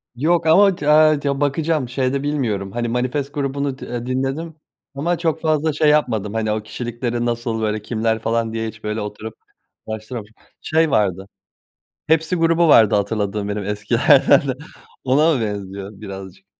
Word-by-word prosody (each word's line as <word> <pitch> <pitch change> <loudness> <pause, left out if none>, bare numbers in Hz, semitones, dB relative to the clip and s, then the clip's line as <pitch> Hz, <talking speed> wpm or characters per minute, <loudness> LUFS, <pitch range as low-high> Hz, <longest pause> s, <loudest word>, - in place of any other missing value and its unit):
Yok 165 +6 +1
ama 195 +4 +5
ti 150 -3 -5
a 155 0 +5
ti 140 - -2
bakacağım, 145 -1 0
şeyde 130 +2 -1
bilmiyorum 110 -10 -2
hani 120 0 -2
Manifest 130 +4 -2
grubunu 140 -1 -2
d, - - -7
eee, 120 -1 -5
dinledim 135 +6 -3 0.4
ama 170 +5 -1
çok 160 -2 -1
fazla 155 -1 +1
şey 155 0 +3
yapmadım 115 -9 +1
hani 110 -1 -1
o 105 0 -2
kişilikleri 120 +2 -4
nasıl 120 -1 -2
böyle 110 0 -1
kimler 110 0 -1
falan 115 0 -1
diye 115 0 -2
hiç 110 - -10
böyle 105 +1 -3
oturup 105 +1 -7 0.5
araştıra 110 +2 -5 0.4
Şey 160 -1 +1
vardı, 95 -3 0 0.8
Hepsi 160 +3 +2
grubu 165 0 +3
vardı 110 -8 +6
hatırladığım 105 0 -1
benim 105 0 -3
eskilerden, 130 +8 +4 0.6
ona 150 +5 +3
mı 125 - -1
benziyor 100 -2 -5
birazcık? 95 -2 -9
120 Hz, 155 wpm, -20 LUFS, 110-150 Hz, 0.8 s, vardı